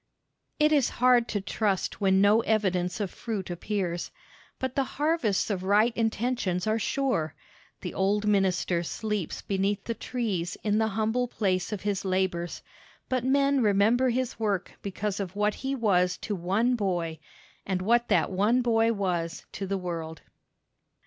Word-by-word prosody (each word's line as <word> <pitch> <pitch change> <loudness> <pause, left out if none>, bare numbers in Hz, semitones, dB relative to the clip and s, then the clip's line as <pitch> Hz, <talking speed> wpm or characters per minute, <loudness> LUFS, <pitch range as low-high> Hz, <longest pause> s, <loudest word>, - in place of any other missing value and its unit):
It 300 0 +4
is 285 -5 +3
hard 245 -1 +4
to 205 - -1
trust 200 0 -1
when 190 -1 +4
no 210 +3 +5
evidence 185 -5 0
of 200 -3 -2
fruit 205 -6 -4
appears. 175 -1 -2 0.5
But 260 -1 -3
the 275 - +2
harvests 290 - +1
of 190 -3 -2
right 210 +5 +3
intentions 225 -5 0
are 220 +1 +1
sure. 220 - -1 0.5
The - - -5
old 205 +2 +1
minister 190 -4 +2
sleeps 210 +1 -3
beneath 195 +1 -1
the 230 - -2
trees 210 -9 -3
in 210 0 +2
the 220 - +2
humble 225 +3 +1
place 190 -4 -1
of 210 - -3
his 200 -2 -1
labors, 185 -2 -1 0.5
but 255 -2 0
men 275 +1 +3
remember 220 +4 +3
his 250 -1 -2
work 205 -4 -1
because 200 +1 -3
of 190 -1 -4
what 210 0 +1
he 270 +1 -3
was 180 -7 +2
to 210 - -3
one 200 +7 +1
boy, 175 -7 -2 0.4
and 190 -2 -1
what 235 +3 +3
that - - +2
one 215 +7 +2
boy 225 -1 +3
was 175 -5 -2
to 195 - -5
the 195 +1 -1
world. 165 -3 -5
205 Hz, 155 wpm, -27 LUFS, 185-230 Hz, 0.5 s, no